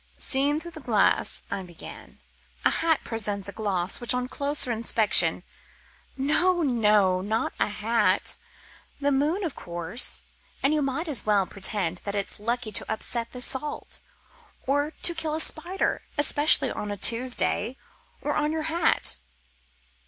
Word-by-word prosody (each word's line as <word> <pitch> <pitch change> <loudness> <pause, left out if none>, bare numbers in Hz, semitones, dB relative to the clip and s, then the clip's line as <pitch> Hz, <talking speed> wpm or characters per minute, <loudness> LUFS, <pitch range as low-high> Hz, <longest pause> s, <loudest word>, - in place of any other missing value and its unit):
"Seen 280 +3 +1
through 340 +1 -9
glass," 220 -6 +2
I 195 - -2
began, 175 -3 -11 0.5
"a - - +5
hat 325 -1 +1
presents 205 -3 -3
a - - -5
gloss 195 -3 -1
which 240 +1 +3
on 250 0 -2
closer 280 -1 -1
inspection 215 -7 +3 0.4
" - - -31
"No, 345 +6 +2
no, 210 -8 +2
not 220 +4 -2
a - - +2
hat, 210 -2 +1 0.6
the 285 0 +1
moon, 300 +9 0
of 325 -7 -3
course. 175 +6 -1 0.4
And 275 +3 +3
you 305 - +1
might 275 +5 -2
as 280 -8 0
well 205 -2 +3
pretend 185 -3 0
that 200 0 -3
it's 200 0 -3
lucky 230 +1 -2
to 205 - -1
upset 230 +1 -2
the 250 - -4
salt, 270 +4 +1 0.7
or 285 +2 +1
to 345 - +4
kill 310 -2 -3
a - - -2
spider, 345 +4 -1 0.2
especially 290 +1 +5
on 210 - -5
a 205 - -4
Tuesday, 240 +1 +1 0.4
or - - -1
on 300 0 0
your 315 -1 -2
hat." 340 -1 +2
240 Hz, 150 wpm, -26 LUFS, 205-290 Hz, 0.7 s, a